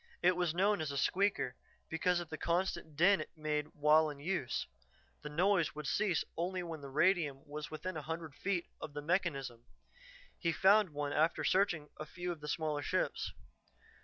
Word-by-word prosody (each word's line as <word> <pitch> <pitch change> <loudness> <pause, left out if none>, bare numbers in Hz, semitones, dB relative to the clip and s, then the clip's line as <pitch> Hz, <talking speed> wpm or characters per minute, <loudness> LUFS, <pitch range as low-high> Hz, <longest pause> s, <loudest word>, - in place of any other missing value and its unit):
It 180 +1 +5
was 175 -2 0
known 200 +1 +3
as 155 - -2
a 140 - -3
"squeaker" 195 -4 +1 0.3
because 175 +2 +1
of 175 -3 -6
the 155 - -5
constant 170 -3 -1
din 190 +6 +5
it - - -7
made 150 -1 -1
while 155 +1 +4
in 145 -1 -8
use; 150 -5 -1 0.6
the 150 - -6
noise 175 +1 +2
would 150 0 -6
cease 185 +4 +1
only 180 +2 -2
when 165 -3 -6
radium 145 0 +1
was 150 +1 -6
within 170 +4 -5
a 155 - -3
hundred 160 0 -5
feet 180 +3 -1 0.2
of 150 - -6
the 145 - -4
mechanism. 140 -9 -1 0.8
He 170 - +1
found 200 +2 +5
one 145 -1 -3
after 160 +2 +2
searching 175 -6 +2
a 155 - -5
few 175 +3 -4
of 165 -3 -7
the 150 - -7
smaller 150 -1 -1
ships. - - -1
160 Hz, 180 wpm, -34 LUFS, 150-180 Hz, 0.8 s, It